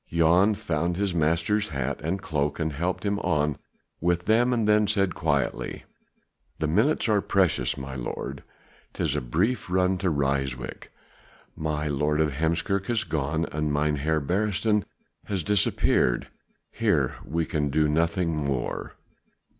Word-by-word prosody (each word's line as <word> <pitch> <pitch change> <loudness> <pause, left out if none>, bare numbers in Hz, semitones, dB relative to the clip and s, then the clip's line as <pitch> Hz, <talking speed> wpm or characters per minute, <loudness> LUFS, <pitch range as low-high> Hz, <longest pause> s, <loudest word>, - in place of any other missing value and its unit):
Jan 85 +6 +4
found 85 0 -1
his 100 -2 0
master's 85 +6 +1
hat 70 -1 -3
and 90 +5 -1
cloak 75 -4 -2
and 80 -1 -1
helped 90 +8 -2
him 100 0 0
on 75 -4 0 0.4
with 85 +1 0
them, 120 +3 +3
and 115 -3 +1
then 105 0 +4
he 105 - +2
said 100 -3 +1
quietly: 70 -5 -1 0.7
"The 80 - -1
minutes 110 - +2
are 105 -2 +3
precious, 95 -4 +1
my 65 0 -6
lord, 65 +2 -5 0.5
'tis - - -1
a - - 0
brief 90 - 0
run 90 0 +2
to 95 -1 +1
Ryswyk: 70 -3 -2 0.7
my 75 -1 -2
Lord 75 +1 0
of 80 -1 +2
Heemskerk 85 +7 0
has 115 -3 +1
gone 80 0 -1
and 75 0 -1
Mynheer 75 +1 +1
Beresteyn 105 +5 +1 0.4
has 95 -4 -2
disappeared. 100 -10 +2 0.4
Here - - +1
we 80 +1 -1
can 75 -2 -1
do 75 +2 +2
nothing 85 +2 +1
more." 70 -4 -3
80 Hz, 145 wpm, -26 LUFS, 75-95 Hz, 0.7 s, Jan